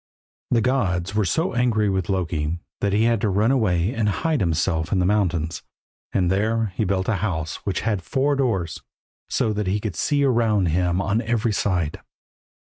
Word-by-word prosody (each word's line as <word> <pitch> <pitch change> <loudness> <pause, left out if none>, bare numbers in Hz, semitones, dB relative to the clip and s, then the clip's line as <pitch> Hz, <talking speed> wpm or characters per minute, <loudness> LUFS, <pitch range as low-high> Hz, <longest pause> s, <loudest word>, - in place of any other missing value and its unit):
The 115 - +3
gods 100 -7 0
were 105 -1 +1
so 160 - 0
angry 120 -4 +2
with 95 -3 -1
Loki 85 -4 -1 0.2
that 100 - 0
he 105 +3 +2
had 115 -2 +2
to 105 - +1
run 105 +5 +2
away 100 -5 +1
and 110 -2 0
hide 155 - 0
himself 80 -2 0
in 100 - +2
the 90 - +2
mountains, 90 -5 0 0.5
and 90 -2 +1
there 110 +1 0
he 110 - 0
built 95 0 0
a 110 - +1
house 80 -6 -2
which 95 - 0
had 105 -4 -1
four 140 +9 0
doors, 100 - -1 0.5
so 110 - +1
that 105 -2 -2
he 100 +3 +1
could 105 -4 -4
see 145 - +1
around 115 -8 +2
him 90 +2 +1
on 110 +3 +1
every 115 -1 0
side. 90 -6 -1
100 Hz, 185 wpm, -23 LUFS, 90-115 Hz, 0.5 s, The